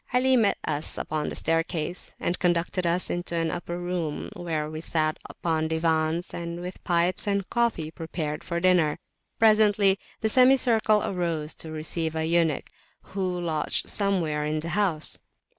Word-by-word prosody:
Ali 255 +1 +4
met 225 -5 +3
us 150 0 -1
upon 155 -1 -2
the - - -6
staircase, 165 +1 -1
and 175 - 0
conducted 175 0 +1
us 175 +2 0
into 175 -1 -3
an 165 -1 0
upper 175 0 -4
room, 175 -4 -3
where 160 -3 -2
we 155 +1 -6
sat 155 -2 0
upon 160 -2 -1
diwans, 160 +1 0
and 170 0 -5
with 180 +1 -7
pipes 175 +2 +1
and 200 -1 0
coffee 230 -10 0
prepared 160 -2 -4
for 170 0 -2
dinner. 175 -4 +3 0.4
Presently 210 -3 +5 0.2
the 220 - +2
semicircle 235 -3 +4
arose 170 -5 -2
to 160 - -7
receive 160 +1 -2
a 160 0 0
eunuch, 165 -3 +1 0.4
who 185 -2 -1
lodged 160 -3 0
somewhere 175 -7 0
in 150 +1 -1
the 160 +2 -4
house. 175 -4 0
170 Hz, 155 wpm, -26 LUFS, 160-190 Hz, 0.4 s, Presently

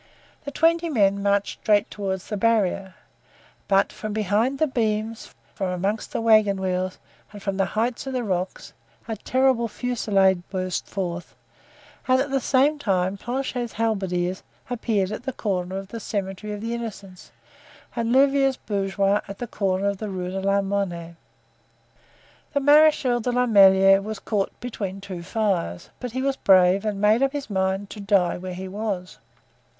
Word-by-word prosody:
The - - -3
twenty 335 +2 +2
men 200 -7 +2
marched 200 0 0
straight 210 -2 +2
toward 190 -2 -3
the 210 - -5
barrier, 195 -3 +1 0.7
but 195 0 +2
from 215 -1 -5
behind 215 +6 +1
the 315 - +3
beams, 220 -4 -2 0.2
from 190 - -2
among 195 +4 -1
the - - -3
wagon 215 -3 +4
wheels 185 0 -2 0.3
and 205 - -10
from 195 -1 -2
the 195 -1 +1
heights 235 +4 -1
of 265 - -3
the 250 -1 -1
rocks 185 -3 -3 0.3
a 225 - -3
terrible 255 +1 +1
fusillade 205 -6 +1
burst 185 -1 -3
forth 175 -3 -5 0.7
and 255 0 +4
at 275 +1 -1
the 270 - +2
same 280 +4 +2
time 190 -6 0
Planchet's 245 +1 -3
halberdiers 190 -5 -1 0.3
appeared 210 -5 0
at 215 - -5
the 265 +1 -4
corner 190 -4 -2
of 195 0 -7
the 230 - -6
Cemetery 200 -1 -4
of 205 - -6
the 230 +1 -3
Innocents, 200 -6 -7 0.6
and 230 0 -1
Louvieres's 270 0 +4
bourgeois 200 0 0
at 200 0 -8
the 245 - -4
corner 195 -3 -1
of 200 -1 -1
the 215 - -4
Rue 180 -1 -4
de 190 - -3
la 195 +1 +2
Monnaie. 185 -4 -3 1.4
The 285 - +2
Marechal 290 -3 +5
de 245 +2 -1
la 250 +1 +2
Meilleraie 195 -3 +6
was 215 +1 -5
caught 200 -2 -2
between 200 -6 -5
two 190 -3 -7
fires, 185 - -2
but 245 -2 -6
he 260 +1 -2
was 275 0 0
brave 190 +1 +4
and 210 -2 -2
made 210 +4 +4
up 275 0 +2
his 285 -5 -5
mind 190 +1 -1
to 215 - -8
die 195 -4 +2
where 185 0 -6
he 190 +1 -6
was. 195 -2 -4
205 Hz, 165 wpm, -24 LUFS, 190-235 Hz, 1.4 s, Meilleraie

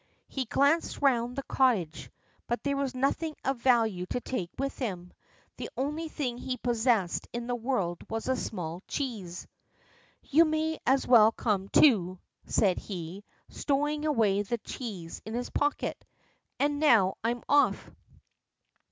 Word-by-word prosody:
He 265 -2 -3
glanced 285 +7 +2
round 245 -3 +2
the 275 - -3
cottage, 220 - +1 0.4
but 240 - -2
there 280 -1 0
was 275 -2 -2
nothing 300 +4 0
of 270 0 0
value 225 -8 +2
to 250 - -2
take 215 -9 -4
with 275 +1 -2
him. 180 -8 -4 0.4
The - - -5
only 300 +5 -2
thing 250 -6 -3
he 255 0 -3
possessed 230 -7 +1
in 240 0 -4
the 245 - -2
world 230 -8 -1
was 225 0 -3
a 260 - +2
small 175 -7 -4
cheese. 210 -11 -4 0.8
"You 320 +4 +5
may 315 0 -1
as 265 +1 +3
well 225 -3 +7
come, 205 -4 -1
too," 190 - +4 0.3
said 190 -4 +2
he, 185 0 -7 0.3
stowing 295 +1 -1
away 220 -9 +2
the 220 +4 -2
cheese 205 -8 -7
in 220 +1 -6
his 245 +1 -3
pocket, 290 0 -1 0.6
"and 290 0 +1
now 225 -11 +4
I'm 240 +1 -1
off." 290 0 +2
245 Hz, 145 wpm, -29 LUFS, 200-275 Hz, 0.8 s, well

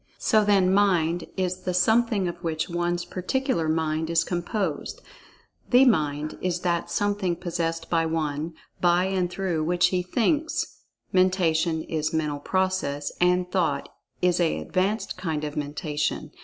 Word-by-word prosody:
So, 215 -1 +3
then, 195 -3 +3
"Mind" 175 -4 +2
is 185 -1 -1
the 180 -1 -2
something 220 0 +3
of 175 - -4
which 160 -2 -2
one's 175 0 -1
particular 185 - -1
Mind 160 0 0
is 165 0 +3
composed; 175 +4 -3 0.7
"The 255 +2 +6
Mind" 155 - +1
is 180 -1 -1
that 170 -2 0
something 205 -3 0
possessed 165 -2 -3
by 165 -1 +1
one, 160 0 -2 0.3
by 175 0 +4
and 190 -2 0
through 175 -3 -1
which 175 +2 +3
he 180 -1 0
"thinks"; 290 - -1 0.3
"Mentation" 170 -3 +2
is 155 -1 -2
mental 150 -2 -1
process; 185 -5 -1
and 180 0 +2
"Thought" 180 -3 0 0.3
is 180 0 +3
a 170 -2 +2
advanced 195 +4 -1
kind 160 -5 -2
of 150 -1 -4
Mentation. 150 0 -2
175 Hz, 140 wpm, -25 LUFS, 160-185 Hz, 0.7 s, The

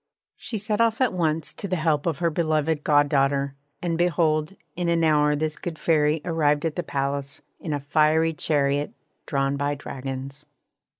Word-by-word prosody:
She 225 - -4
set 210 +2 -1
off 225 -1 +2
at 260 -5 +2
once 160 -3 -1
to 200 - -6
the 185 - -1
help 155 -2 0
of 160 -4 0
her 170 -1 0
beloved 155 -1 0
goddaughter, 140 -1 +2 0.3
and 170 -1 -1
behold 160 -1 +1 0.2
in 175 -1 -1
an 165 -1 +2
hour 150 -1 +3
this 155 +1 -2
good 170 -3 -5
Fairy 150 -1 +2
arrived 150 -3 +1
at 160 - -1
the 175 - -1
palace, 140 -2 -3 0.2
in 160 - -5
a 145 - -1
fiery 155 +3 +2
chariot 145 -2 0 0.3
drawn 140 -1 0
by 145 +1 -1
dragons. 135 +1 -7
155 Hz, 170 wpm, -24 LUFS, 145-165 Hz, 0.3 s, hour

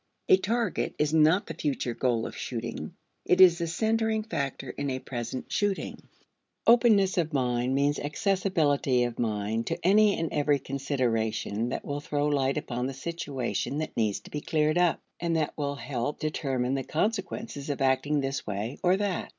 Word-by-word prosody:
A 380 - +8
target 230 - -1
is 150 0 +1
not 160 +5 +4
the - - -6
future 135 -4 -2
goal 120 -2 0
of - - -6
shooting; - - -5 0.3
it 180 - +2
is 180 -2 +8
the 170 - -1
centering 220 +5 0
factor 140 - -3
in 140 0 -3
a 130 - -1
present 125 -1 -5
shooting. 205 -2 -1 0.6
Openness 220 -6 +5
of 160 -2 -1
mind 125 -1 +1
means 145 +1 +2
accessibility 150 - +1
of 120 -1 -3
mind 110 0 -1
to - - -1
any 205 +2 +5
and 165 - -2
every 145 -1 +2
consideration 120 -5 -1
that - - -4
will 145 0 -3
throw 145 0 -1
light 140 -2 +1
upon 125 -3 -2
the 135 - -5
situation 140 -3 -3
that 155 0 -4
needs 110 -3 0
to - - -14
be 150 - -3
cleared 155 +2 +1
up, 175 -2 +3 0.2
and 170 -1 0
that 155 -2 0
will 145 -1 -2
help 140 0 -3
determine 135 -4 -1
the 135 -1 -1
consequences 195 - -2
of 145 - -2
acting 135 +2 +2
this 135 0 -3
way 105 +5 -4
or 185 +1 +3
that. 200 -3 -2
145 Hz, 175 wpm, -28 LUFS, 130-175 Hz, 0.6 s, A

